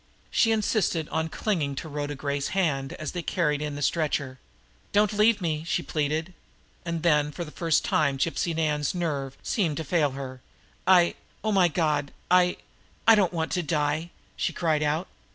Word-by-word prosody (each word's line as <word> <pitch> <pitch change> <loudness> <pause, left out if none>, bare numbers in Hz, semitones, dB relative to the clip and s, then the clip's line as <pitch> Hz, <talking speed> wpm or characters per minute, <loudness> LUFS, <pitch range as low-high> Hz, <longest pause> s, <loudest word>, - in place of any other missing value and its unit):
She 225 - +3
insisted 210 -7 +1
on 160 0 -1
clinging 160 -8 -1
to 145 - -5
Rhoda 145 -1 -4
Gray's 140 0 -2
hand 135 -7 0
as 155 - -5
they 175 - -3
carried 150 -4 0
in 150 -1 -3
the 145 - -4
stretcher. 140 -5 0 0.5
"Don't 210 0 +3
leave 210 +1 +4
me!" 155 -3 -1
she 165 - -1
pleaded. 155 +3 -1 0.5
And 170 -2 -3
then, 150 -3 +3
for 175 - -5
the 150 - -10
first 165 -2 +1
time, 140 -3 +2
Gypsy 165 +3 0
Nan's 150 -1 0
nerve 140 -6 -2
seemed 170 -9 0
to 160 - -2
fail 155 0 +2
her. 130 -2 -7 0.5
"I 180 -2 +6 0.3
oh, 215 - +1
my 190 -3 +5
God 150 -4 0 0.2
I 180 0 +4 0.5
I 225 - +10
don't 200 -5 +3
want 165 -2 -2
to 180 - +1
die!" 155 +1 -1 0.3
she - - -1
cried 155 -3 0
out. 155 +4 0
160 Hz, 175 wpm, -26 LUFS, 145-175 Hz, 0.5 s, I